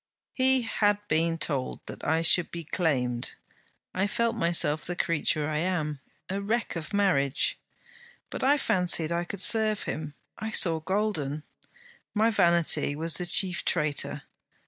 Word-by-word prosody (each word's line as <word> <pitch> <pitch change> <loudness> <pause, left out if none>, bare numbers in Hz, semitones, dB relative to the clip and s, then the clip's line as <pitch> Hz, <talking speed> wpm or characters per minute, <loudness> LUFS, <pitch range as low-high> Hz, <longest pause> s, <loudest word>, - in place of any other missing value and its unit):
He 260 -1 +2
had 205 -2 +1
been 165 0 +1
told 140 -5 -2
that - - -9
I 160 +2 +1
should 175 +1 +6
be 170 -1 -6
claimed. 130 -8 -1 0.6
I 190 +2 0
felt 230 +2 0
myself 170 -6 0
the 175 +5 -4
creature 155 -3 0
I 155 -1 -1
am 155 -5 -2 0.3
a 195 +1 -3
wreck 225 +2 -2
of 160 -2 -6
marriage. 180 -10 +2 0.7
But - - -4
I 280 +3 +4
fancied 180 - 0
I 170 +1 -1
could 190 +1 -6
serve 215 -1 +1
him: 150 -2 -5 0.2
I 220 - -4
saw 165 -6 +2
golden. 160 -6 -2 0.7
My 220 +2 +3
vanity 170 -6 +2
was 160 +2 0
the 180 - -1
chief 180 0 +4
traitor. 145 -1 -1
170 Hz, 145 wpm, -27 LUFS, 155-205 Hz, 0.7 s, should